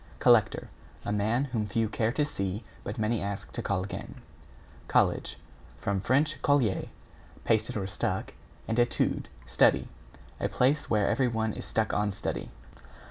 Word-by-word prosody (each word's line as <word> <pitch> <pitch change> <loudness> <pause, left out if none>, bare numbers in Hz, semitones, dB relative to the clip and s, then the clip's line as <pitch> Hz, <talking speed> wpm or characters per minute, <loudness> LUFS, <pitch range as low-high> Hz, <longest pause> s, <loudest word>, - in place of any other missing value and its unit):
=COLLECTOR= - - +4 0.4
A - - -1
man 110 +5 +1
whom 110 -3 0
few 110 +2 +1
care 110 +1 0
to 145 +3 +1
see 100 -6 -3 0.2
but 105 - -5
many 110 +1 0
ask 100 0 -4
to - - -3
call 95 -2 0
again. 100 - -6 0.7
=COLLEGE= - - +2 0.4
From 100 -1 0
Fr. 110 +7 +2 0.3
colle, 130 -10 +2 0.6
pasted 110 -1 +1
or 100 - -2
stuck, 95 - -2 0.3
and 115 +2 0
etude, 120 0 +1 0.2
study. - - +3 0.5
A - - 0
place 140 +4 +2
where 105 -3 +3
everyone 115 -5 +1
is - - -6
stuck 110 -1 0
on 105 0 +1
study. 100 - -4
110 Hz, 145 wpm, -29 LUFS, 100-120 Hz, 0.7 s, =COLLECTOR=